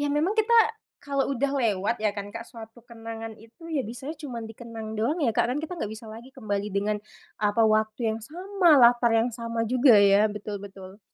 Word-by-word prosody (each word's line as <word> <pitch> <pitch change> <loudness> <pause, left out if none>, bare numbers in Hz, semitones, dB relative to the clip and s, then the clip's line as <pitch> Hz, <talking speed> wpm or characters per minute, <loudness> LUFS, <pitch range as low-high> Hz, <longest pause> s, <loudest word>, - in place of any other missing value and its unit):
ya 290 0 0
memang 310 +8 +1
kita 440 +1 +2 0.5
kalau 280 -1 -1
udah 275 +2 0
lewat 225 -4 0
ya 215 - +2
kan 205 0 -6
Kak, 230 - -5
suatu 230 0 -13
kenangan 225 -1 -8
itu 245 +10 -14
ya 295 - +1
bisanya 245 +6 -6
cuman 250 -7 -6
dikenang 225 -1 -8
doang 295 +10 0
ya 250 - +3
Kak, 220 - +1
kan 250 - -1
kita 320 - -5
enggak 215 -4 -4
bisa 225 +1 -12
lagi 230 +4 -10
kembali 205 -5 -3
dengan 205 +1 0 0.4
apa, 210 +2 +2
waktu 215 +1 +1
yang 220 - -3
sama, 360 - -1
latar 240 0 +5
yang 225 +2 +2
sama 230 0 -4
juga 250 +2 +5
ya, 200 +1 +5
betul 210 0 -6
betul. 195 0 -11
230 Hz, 200 wpm, -26 LUFS, 215-265 Hz, 0.5 s, latar